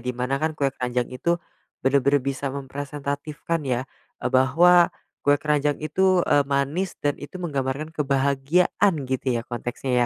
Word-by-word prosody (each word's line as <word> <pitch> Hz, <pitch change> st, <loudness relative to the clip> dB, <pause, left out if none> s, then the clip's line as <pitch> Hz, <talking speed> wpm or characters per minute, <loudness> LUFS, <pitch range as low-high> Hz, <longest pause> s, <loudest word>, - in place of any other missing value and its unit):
di 125 Hz, +1 st, -4 dB
mana 130 Hz, +2 st, -1 dB
kan, 155 Hz, 0 st, -1 dB
kue 140 Hz, -2 st, 0 dB
keranjang 125 Hz, -1 st, -2 dB
itu 170 Hz, +7 st, 0 dB, 0.5 s
benar-benar 140 Hz, 0 st, +3 dB
bisa 140 Hz, 0 st, -2 dB
mempresentatifkan 145 Hz, +3 st, -4 dB
ya, 125 Hz, 0 st, 0 dB, 0.3 s
eee, -, -, -3 dB
bahwa 170 Hz, +7 st, +5 dB, 0.3 s
kue 145 Hz, 0 st, +4 dB
keranjang 150 Hz, -1 st, +1 dB
itu, 185 Hz, +3 st, +2 dB
eee, 145 Hz, -, +4 dB
manis 145 Hz, +7 st, -1 dB
dan 145 Hz, -1 st, 0 dB
itu 145 Hz, +6 st, -8 dB
menggambarkan 150 Hz, -2 st, -3 dB
kebahagiaan 140 Hz, +6 st, +2 dB
gitu 130 Hz, +1 st, -3 dB
ya 120 Hz, -2 st, 0 dB
konteksnya 120 Hz, +2 st, -4 dB
140 Hz, 145 wpm, -24 LUFS, 130-155 Hz, 0.5 s, bahwa